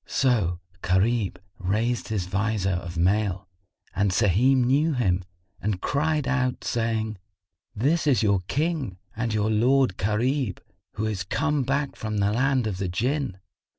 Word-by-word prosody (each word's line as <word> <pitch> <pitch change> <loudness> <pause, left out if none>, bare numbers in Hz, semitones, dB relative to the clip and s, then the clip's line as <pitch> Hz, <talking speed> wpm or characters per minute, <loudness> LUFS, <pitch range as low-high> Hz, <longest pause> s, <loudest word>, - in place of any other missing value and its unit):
So 105 -10 +1 0.2
Gharib 100 +3 +1 0.2
raised 110 +6 0
his 105 -5 -2
vizor 95 +1 0
of 90 -1 -4
mail 95 +2 +1 0.5
and 100 +2 +2
Sahim 115 +7 +3
knew 145 +5 +3
him 95 -8 +1 0.4
and 105 -3 -1
cried 150 +2 0
out, 130 -2 0
saying, 110 -3 -1 0.6
"This 150 +8 +1
is 130 -5 +3
your 100 -2 +3
King 150 - -1 0.2
and 115 +1 -1
your 105 0 +1
lord 125 -1 +3
Gharib, 115 +2 0 0.4
who 105 - -2
is 105 -4 -2
come 150 +9 0
back 140 +2 -1
from 110 -1 -3
the 100 +1 +2
land 130 +1 +2
of 100 -4 -3
the 95 -2 -1
Jann!" 125 +3 -1
110 Hz, 145 wpm, -25 LUFS, 95-130 Hz, 0.6 s, Sahim